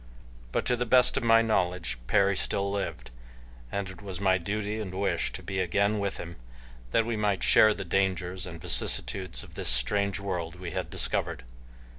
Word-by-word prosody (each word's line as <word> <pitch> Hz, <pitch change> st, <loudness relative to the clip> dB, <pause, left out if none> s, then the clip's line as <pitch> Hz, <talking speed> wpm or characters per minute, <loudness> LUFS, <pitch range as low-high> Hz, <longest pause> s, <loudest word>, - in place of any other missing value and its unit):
But, -, -, -1 dB
to 125 Hz, -, +2 dB
the 120 Hz, 0 st, -2 dB
best 125 Hz, +2 st, +5 dB
of -, -, +1 dB
my 115 Hz, 0 st, +5 dB
knowledge, 90 Hz, -, -1 dB
Perry 100 Hz, +7 st, +3 dB
still 100 Hz, +1 st, -1 dB
lived 100 Hz, -10 st, -4 dB, 0.6 s
and 100 Hz, -1 st, -2 dB
it 95 Hz, -2 st, -10 dB
was 95 Hz, -3 st, -6 dB
my 95 Hz, -2 st, +3 dB
duty 105 Hz, +4 st, -3 dB
and 95 Hz, -4 st, -5 dB
wish 100 Hz, -, 0 dB
to -, -, -7 dB
be 95 Hz, -1 st, -3 dB
again 100 Hz, +4 st, +1 dB
with 100 Hz, -1 st, -2 dB
him, 85 Hz, 0 st, -8 dB, 0.5 s
that 110 Hz, -, +2 dB
we 115 Hz, 0 st, -1 dB
might 105 Hz, -3 st, 0 dB
share 110 Hz, -1 st, +6 dB
the -, -, -6 dB
dangers 95 Hz, 0 st, -1 dB
and 85 Hz, -2 st, -8 dB
vicissitudes 95 Hz, +3 st, 0 dB
of -, -, -14 dB
the -, -, -5 dB
strange 100 Hz, +12 st, +2 dB
world 90 Hz, -4 st, -4 dB
we 90 Hz, -1 st, -7 dB
had -, -, -3 dB
discovered. -, -, -2 dB
100 Hz, 185 wpm, -28 LUFS, 90-105 Hz, 0.6 s, share